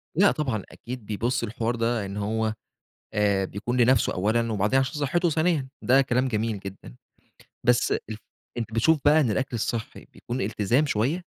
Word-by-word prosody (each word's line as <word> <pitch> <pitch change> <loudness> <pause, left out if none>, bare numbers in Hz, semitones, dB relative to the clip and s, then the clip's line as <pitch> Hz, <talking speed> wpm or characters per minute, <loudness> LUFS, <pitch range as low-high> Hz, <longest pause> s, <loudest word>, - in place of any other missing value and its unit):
لأ 200 +5 +5
طبعًا، 125 -10 -2
أكيد 125 -2 -8
بيبُص 120 +4 -1
للحوار 115 +1 -2
ده 115 -2 0
إن 100 +1 -6
هو 110 +1 -1 0.6
آآ 100 -2 +2
بيكون 115 +6 -2
لنفسه 125 0 +4
أولًا، 110 +4 +1
وبعدين 105 +5 +2
عشان 130 -1 0
صحّته 175 +5 +1
ثانيًا 155 -3 +1
ده 130 +3 +5
كلام 130 0 +1
جميل 110 -2 -1
جدًا. 95 -11 -10 0.7
بس 120 0 +3
أ - - +2 0.6
أنت 115 -1 -4
بتشوف 155 +8 +4
بقى 150 +2 +6
إن 130 -7 +1
الأكل 125 +4 -1
الصحّي 115 0 -4
بيكون 120 +2 -5
التزام 110 +7 +1
شوية، 140 +8 0
120 Hz, 165 wpm, -25 LUFS, 105-130 Hz, 0.7 s, بقى